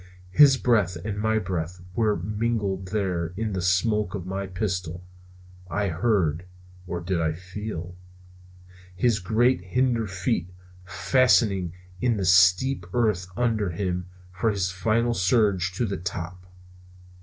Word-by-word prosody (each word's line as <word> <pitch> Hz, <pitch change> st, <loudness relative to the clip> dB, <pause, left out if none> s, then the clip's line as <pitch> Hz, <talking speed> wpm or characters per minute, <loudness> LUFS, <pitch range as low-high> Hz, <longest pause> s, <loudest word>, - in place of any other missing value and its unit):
His 140 Hz, +3 st, +7 dB
breath 105 Hz, -9 st, +2 dB
and 105 Hz, -1 st, -3 dB
my 110 Hz, 0 st, +2 dB
breath 90 Hz, -3 st, -3 dB
were 110 Hz, 0 st, +2 dB
mingled 105 Hz, 0 st, -2 dB
there 90 Hz, -4 st, -2 dB
in 110 Hz, -1 st, -2 dB
the 95 Hz, -, -2 dB
smoke 95 Hz, +3 st, +1 dB
of 90 Hz, -3 st, -5 dB
my 95 Hz, +1 st, -4 dB
pistol. 90 Hz, -3 st, -3 dB, 0.7 s
I 100 Hz, +3 st, -1 dB
heard 85 Hz, -3 st, 0 dB, 0.4 s
or 90 Hz, -2 st, -4 dB
did 90 Hz, -1 st, -1 dB
I 80 Hz, -1 st, 0 dB
feel 90 Hz, 0 st, -7 dB, 1.0 s
his 110 Hz, +3 st, +2 dB
great 115 Hz, +5 st, +2 dB
hinder 115 Hz, +4 st, 0 dB
feet 95 Hz, +1 st, -2 dB, 0.4 s
fastening 100 Hz, -3 st, +2 dB, 0.3 s
in 120 Hz, -3 st, +1 dB
the 95 Hz, -, -1 dB
steep 90 Hz, +5 st, +4 dB
earth 105 Hz, -7 st, +1 dB
under 110 Hz, -5 st, +1 dB
him 90 Hz, 0 st, -3 dB, 0.2 s
for 95 Hz, +5 st, 0 dB
his 95 Hz, -3 st, -1 dB
final 110 Hz, +6 st, +1 dB
struggle 100 Hz, -1 st, +2 dB, 0.2 s
to 120 Hz, -, 0 dB
the 100 Hz, -2 st, -3 dB
top? 90 Hz, +1 st, -6 dB
95 Hz, 130 wpm, -25 LUFS, 90-110 Hz, 1.0 s, His